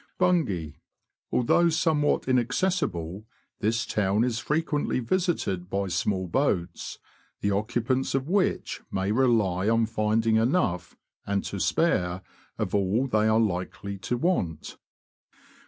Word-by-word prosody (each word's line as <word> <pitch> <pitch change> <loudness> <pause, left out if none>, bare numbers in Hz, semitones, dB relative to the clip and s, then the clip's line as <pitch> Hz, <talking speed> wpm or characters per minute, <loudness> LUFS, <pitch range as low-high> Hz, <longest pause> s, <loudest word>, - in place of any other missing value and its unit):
Bungay. 140 - +1 0.3
— - - -59
Although 170 +8 +3
somewhat 155 -3 +1
inaccessible, 120 - 0 0.3
this 110 +1 0
town 105 +1 +1
is 120 -2 0
frequently 150 +3 0
visited 120 - -1
by 100 -1 -1
small 95 +1 -1
boats, 95 - -1 0.4
the 100 - +1
occupants 120 +6 0
of 135 +1 -1
which 190 +2 0
may 95 +1 -1
rely 110 -6 +2
on 115 0 +3
finding 110 0 +1
enough, 110 - 0 0.3
and 100 -1 0
to 100 - -5
spare, 90 - +1 0.3
of - - -2
all 100 +6 +2
they 110 -4 +2
are 110 0 +4
likely 100 -1 -2
to 120 +6 -2
want. 120 - -1
110 Hz, 120 wpm, -26 LUFS, 95-135 Hz, 0.4 s, are